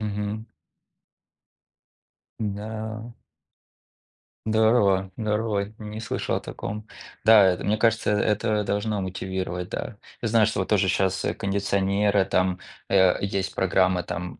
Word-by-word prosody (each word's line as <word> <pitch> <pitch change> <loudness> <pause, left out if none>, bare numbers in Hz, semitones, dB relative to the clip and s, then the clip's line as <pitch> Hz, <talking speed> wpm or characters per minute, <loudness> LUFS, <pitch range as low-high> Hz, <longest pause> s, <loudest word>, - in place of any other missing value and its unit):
Мгм. 105 +1 -3 1.9
Да. 110 +2 -5 1.3
Здорово 110 -4 +3
здорово, 105 -2 -1
не 105 0 -7
слышал 115 - -2
о - - -3
таком. 105 +1 -7 0.4
Да, 110 -2 +8
это, 90 -1 +1
мне 105 +1 +1
кажется, 115 -1 +2
э, - - +3
это 105 0 +1
должно 105 +1 -1
мотивировать, 95 -1 -4
да. 105 - -5 0.2
Я 115 - -1
знаю, 110 -1 +4
что 110 - -2
вот 95 - -2
тоже 100 -3 +3
щас, 95 +1 +1
э, - - 0
кондиционеры, 100 0 +1
там, 95 0 +1 0.3
э, 95 -2 +4
есть 100 -1 -2
программа 95 -1 +2
там, 90 +1 -6
100 Hz, 125 wpm, -25 LUFS, 95-110 Hz, 1.9 s, Да